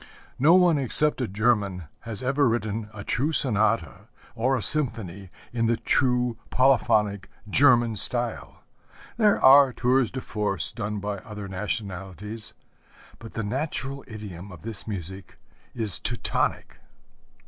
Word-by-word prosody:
No 155 +7 +6
one 175 -5 +4
except 140 +2 +2
a 125 - -1
German 100 -3 0 0.2
has 115 +1 -6
ever 135 0 +2
written 110 -1 -2
a 105 -2 -9
true 145 +10 -1
sonata 110 - 0 0.3
or 130 +4 +1
a 110 - -3
symphony, 100 - +1 0.2
in 115 -1 0
the 115 0 +1
true 125 -3 +1
polyphonic 105 -6 +2 0.2
German 120 -1 +4
style. 120 +3 -2 0.5
There 210 -3 +3
are 135 0 +8
tours 125 0 +1
de 130 - -5
force 105 -8 -2
done 105 +1 -4
by 100 0 -4
other 105 0 -8
nationalities; 100 +1 -5 0.6
but 115 -1 -11
the 115 - -3
natural 135 +3 -3
idiom 100 -4 -9
of 85 -4 -12
this 110 -1 -6
music 95 -2 -7 0.4
is 110 -5 -1
Teutonic. - - -2
115 Hz, 130 wpm, -25 LUFS, 100-130 Hz, 0.6 s, are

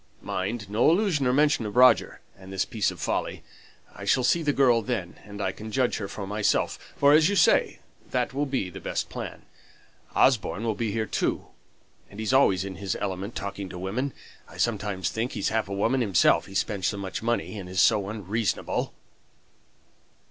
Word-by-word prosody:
Mind, 100 +3 -3
no 105 +8 +3
allusion 170 -6 +2
or - - +3
mention 145 -1 +3
of 105 - -7
Roger, 125 0 +5
and 95 0 -13
this 95 0 0
piece 105 -5 0
of - - -9
folly. - - -2 0.5
I - - -10
shall 130 - +2
see 170 +7 +3
the 150 -2 +1
girl 125 -5 +4
then, 105 -8 -4
and 100 -1 -9
I 95 -2 0
can 110 +3 -9
judge 125 +1 +1
her 100 - -4
for 100 0 -6
myself; 105 +1 0 0.2
for, 140 +1 +5
as 155 +3 +5
you 205 - 0
say, 170 - +4 0.3
that 125 0 -1
will 145 +2 -1
be 130 -9 -2
the - - -8
best - - -3
plan. - - -7 0.7
Osborne 115 -4 +2
will 115 -1 0
be 110 0 -2
here 110 +1 -1
too; - - -2 0.6
and 100 - -12
he's 110 +3 -1
always 100 -8 +4
in 95 -3 -7
his 95 -1 -3
element 100 +2 -4
talking 100 -1 -5
to 90 - -8
women. 110 +10 -2 0.4
I - - -14
sometimes 105 -5 -1
think 115 +3 -2
he's - - -1
half 110 -2 -1
a 100 - -3
woman 120 +6 +1
himself, 100 -6 +3
he 95 - -11
spends 95 -2 0
so 105 - -1
much 95 -1 -5
money 115 -2 -2
and 90 -2 -8
is 95 0 -2
so 105 -2 +4
unreasonable." 105 +1 -2
110 Hz, 195 wpm, -26 LUFS, 100-125 Hz, 0.7 s, Roger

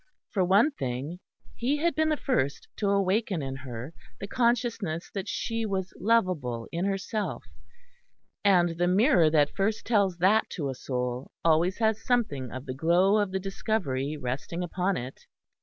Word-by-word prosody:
For 190 - +1
one 200 - +4
thing, 135 - -4 0.4
he 265 +5 0
had 335 +3 +1
been 315 0 +1
the 305 - +1
first 145 - -1
to 205 - 0
awaken 200 -3 +1
in 135 0 -4
her 130 +2 -7 0.3
the - - -4
consciousness 230 -8 0
that 195 -2 -4
she 230 -1 -2
was 190 -3 -2
lovable 180 - +1
in 170 +2 -1
herself, 200 +2 -2 1.0
and 180 -4 +5
the 175 - +3
mirror 185 - +4
that 150 -2 +2
first 210 +2 0
tells 200 -6 +2
that 200 +6 +3
to 145 -6 -2
a - - -2
soul 125 0 -3 0.2
always 170 +3 +3
has 220 -1 +1
something 150 - 0
of 130 +1 -7
the 130 - -4
glow 175 +8 +3
of 205 -2 +1
the 190 - -1
discovery 180 - -2
resting 140 +6 -4
upon 180 +2 -1
it. 125 +2 -8
185 Hz, 160 wpm, -28 LUFS, 145-215 Hz, 1.0 s, and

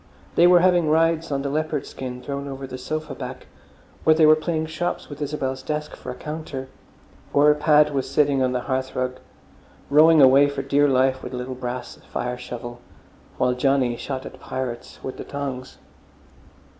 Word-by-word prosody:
They 170 - +6
were 175 -1 +6
having 175 -3 +3
rides 165 0 +2
on 135 -1 -1
the 140 - -2
leopard 155 -1 -1
skin 125 -1 -7
thrown 140 +1 -4
over 135 -1 -6
the 130 -1 -8
sofa 155 +2 -4
back, 130 +1 -7 0.6
or 155 - +5
they 160 0 +5
were 155 0 +8
playing 160 0 -2
shops 160 +2 -3
with 145 0 -9
Isabel's 135 -3 -3
desk 150 0 -4
for - - -9
a 125 - -5
counter, 150 -4 -6 0.6
or 150 +1 +6
Pad 150 0 +4
was 135 -2 -1
sitting 140 -2 +2
on 130 -1 +2
the 125 -1 -1
hearthrug 130 -1 -2 0.7
rowing 155 +2 +7
away 140 +1 +7
for 140 -1 -4
dear 145 +1 +3
life 130 -1 +2
with - - -7
a - - -3
little 125 +1 -4
brass 125 -1 -6
fire 125 0 -2
shovel, 120 -1 -7 0.6
while 125 - +2
Johnny 130 -1 +1
shot 130 +2 -5
at - - -10
pirates 125 -2 -5
with 130 - -6
the - - -6
tongs. 135 -3 -6
140 Hz, 180 wpm, -23 LUFS, 130-155 Hz, 0.7 s, were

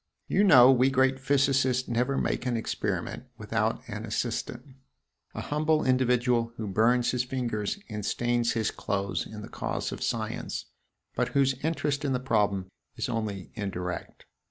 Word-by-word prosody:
You 200 - +3
know 135 -10 +8
we 130 0 +4
great 135 0 +2
physicists 135 -2 +2
never 125 +3 0
make 125 - -1
an 120 -2 0
experiment 110 - -3
without - - -1
an - - -5
'assistant' 135 - -3 0.6
a - - -3
humble 155 +1 +1
individual 125 -2 +2
who 110 - -4
burns 115 +5 +2
his 125 -1 0
fingers 120 - -2
and 105 -2 -5
stains 120 +2 +1
his 115 -2 0
clothes 100 -3 -2
in 105 -1 -8
the - - -7
cause - - -3
of - - -6
science, - - -3 0.5
but - - 0
whose 135 -1 +4
interest 150 -3 -1
in 140 -2 0
the 125 - 0
problem 105 -7 0 0.2
is - - -3
only 105 -4 -3
indirect. 90 -4 -5
125 Hz, 155 wpm, -28 LUFS, 110-135 Hz, 0.6 s, know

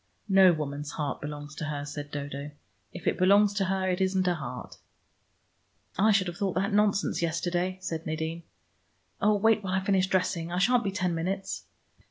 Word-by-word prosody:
"No 190 -2 +7
woman's 145 -2 -4
heart 145 -3 -3
belongs 145 0 -6
to 155 - -5
her," 145 -1 -3
said 145 0 -6
Dodo. 145 0 -5 0.4
"If 180 - -9
it - - 0
belongs 200 +2 +5
to 200 -1 0
her, 190 0 0
it 185 0 0
isn't 190 -1 +1
a 180 - +3
heart." 125 -6 -7 1.2
"I 215 +4 +4
should 200 -2 +3
have 175 -1 -5
thought 195 -3 -1
that 195 +3 0
nonsense 205 -3 +2
yesterday," 175 +2 -1
said 165 -3 -4
Nadine. 160 +1 -3 0.8
"Oh, 210 +1 +4
wait 220 +1 +3
while 185 -1 -1
I - - +3
finish 190 -2 +2
dressing; 175 -3 0
I 175 - -2
shan't 240 +6 +3
be 200 - 0
ten 185 -2 -1
minutes. 190 +4 -3
180 Hz, 185 wpm, -28 LUFS, 155-195 Hz, 1.2 s, No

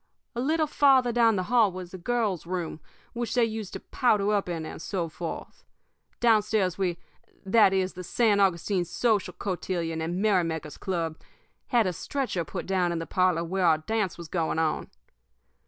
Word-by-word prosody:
A 240 - -1
little 310 +4 +2
farther 270 -4 +4
down 230 -2 +4
the 185 - 0
hall 225 0 +3
was 180 -1 -8
the 185 - -8
girls' 205 -5 -1
room, 175 -3 -3 0.3
which 235 -1 -3
they 240 -2 +4
used 220 -3 -5
to - - -5
powder 210 -4 +1
up 200 -3 0
in, 165 -2 -3
and - - -8
so 180 -2 -2
forth. 165 +1 -7 0.6
Downstairs 215 -5 +3
we 180 -3 -1 0.5
that 200 0 +5
is, 190 -1 0
the 180 - -7
San 210 +2 +2
Augustine 185 0 +2
Social 210 +4 0
Cotillion 170 -4 -3
and 170 +3 -2
Merrymakers' 170 -7 0
Club 165 -4 -2 0.5
had 235 -3 +3
a 185 - 0
stretcher 250 - -2
put 150 - -6
down 185 -2 +1
in 170 - -2
the 165 - -3
parlor 180 -2 +1
where 180 +1 0
our 160 -1 +5
dance 200 +3 -2
was 170 -1 -8
going 165 -1 -1
on. 160 -1 0
190 Hz, 175 wpm, -27 LUFS, 170-220 Hz, 0.6 s, that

